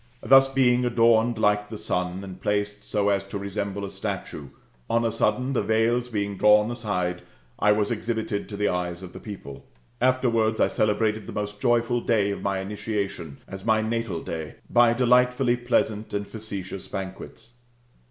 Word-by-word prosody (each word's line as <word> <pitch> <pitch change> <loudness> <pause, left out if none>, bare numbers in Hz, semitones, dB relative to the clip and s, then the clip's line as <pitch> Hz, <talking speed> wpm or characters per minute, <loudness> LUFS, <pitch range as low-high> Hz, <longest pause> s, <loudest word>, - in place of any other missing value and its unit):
Thus 135 0 +6
being 125 -2 +3
adorned 115 -1 +3
like 105 -1 +2
the 110 - -6
sun, 90 -1 -2
and 95 -1 -9
placed 105 0 -2
so 100 -1 +1
as 100 -1 +1
to 100 +1 -5
resemble 100 0 -4
a 100 - -7
statue, 70 - -5 0.4
on 115 0 +2
a 115 - +1
sudden, 125 +4 0
the - - +1
veils 115 +3 +1
being 100 -4 -3
drawn 105 +2 +5
aside, 90 -7 -2 0.4
I 105 - +4
was 105 0 0
exhibited 110 -2 -2
to 100 - -6
the 105 0 +1
eyes 90 0 -2
of 90 - -9
the - - -8
people. 70 -10 -9 0.4
Afterwards, 115 -4 +2
I - - +4
celebrated 105 0 0
the - - -7
most 105 0 -4
joyful 120 -1 +2
day 105 -4 +1
of 100 - -5
my 100 -1 -1
initiation, 100 -6 -4
as 95 0 -8
my 110 0 +2
natal 110 -6 -2
day,^^ 80 -2 -5 0.2
by 120 -1 +6
delightfully 125 0 +3
pleasant 110 -4 -1
and 100 0 -2
facetious 100 -4 -7
banquets. 95 +4 -8
105 Hz, 170 wpm, -25 LUFS, 100-115 Hz, 0.4 s, Thus